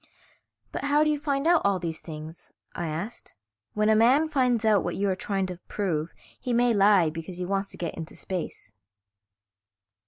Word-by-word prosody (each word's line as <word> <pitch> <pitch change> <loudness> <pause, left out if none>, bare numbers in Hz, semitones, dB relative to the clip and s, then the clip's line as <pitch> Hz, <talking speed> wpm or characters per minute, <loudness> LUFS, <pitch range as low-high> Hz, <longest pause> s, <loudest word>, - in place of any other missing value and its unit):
"But - - -4
how 290 +1 +4
do 305 - +2
you 295 - -1
find 280 -1 -1
out 340 0 +5
all 200 -1 +3
these 165 -3 -4
things?" 155 0 -10 0.2
I 170 - -3
asked. 170 +10 -6 0.4
"When 210 0 +2
a 220 - +5
man 260 +8 +4
finds 250 -6 +2
out 210 -3 +4
what 175 - -2
you 200 - 0
are - - 0
trying 195 0 -1
to 180 -1 -6
prove 170 -6 -2 0.3
he 250 -2 -2
may 240 0 +3
lie 195 -5 +5
because 165 +3 -7
he 180 - -3
wants 195 +1 -1
to - - -11
get 170 - -3
into 165 0 -8
space." 180 - -6
200 Hz, 190 wpm, -27 LUFS, 175-245 Hz, 0.4 s, out